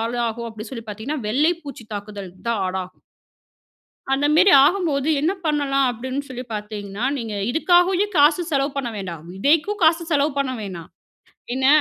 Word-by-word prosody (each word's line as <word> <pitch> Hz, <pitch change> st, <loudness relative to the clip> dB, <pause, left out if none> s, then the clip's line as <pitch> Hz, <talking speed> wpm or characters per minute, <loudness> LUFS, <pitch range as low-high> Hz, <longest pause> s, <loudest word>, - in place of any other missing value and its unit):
ஆளாகும் 235 Hz, 0 st, -2 dB
அப்டின்னு 220 Hz, +2 st, -9 dB
சொல்லி 230 Hz, -3 st, -6 dB
பார்த்தீங்கன்னா, 225 Hz, +8 st, -4 dB
வெள்ளை 300 Hz, +9 st, +3 dB
பூச்சி 260 Hz, -5 st, -9 dB
தாக்குதல் 205 Hz, -2 st, -7 dB, 0.2 s
தான் 220 Hz, -4 st, 0 dB
ஆடாகும். 185 Hz, 0 st, -5 dB, 1.1 s
அந்தமேரி 300 Hz, +7 st, +4 dB
ஆகம்போது 315 Hz, -5 st, +1 dB
என்ன 315 Hz, +6 st, +1 dB
பண்ணலாம்? 280 Hz, -3 st, +1 dB
அப்படின்னு 260 Hz, +4 st, -4 dB
சொல்லி 255 Hz, 0 st, -6 dB
பார்த்தீங்கன்னா, 210 Hz, 0 st, -5 dB
நீங்க 225 Hz, -3 st, -5 dB, 0.2 s
இதுக்காகவே 355 Hz, +6 st, +3 dB
காசு 295 Hz, +4 st, +5 dB
செலவு 275 Hz, 0 st, +1 dB
பண்ண 250 Hz, -4 st, -2 dB
வேண்டாம். 175 Hz, -6 st, -6 dB
விதைக்கும் 325 Hz, -, +1 dB
காசு 330 Hz, +1 st, +4 dB
செலவு 290 Hz, 0 st, +2 dB
பண்ண 275 Hz, -2 st, 0 dB
வேணாம். 180 Hz, -5 st, -7 dB, 0.7 s
என்ன, 260 Hz, 0 st, +1 dB
260 Hz, 140 wpm, -22 LUFS, 215-300 Hz, 1.1 s, காசு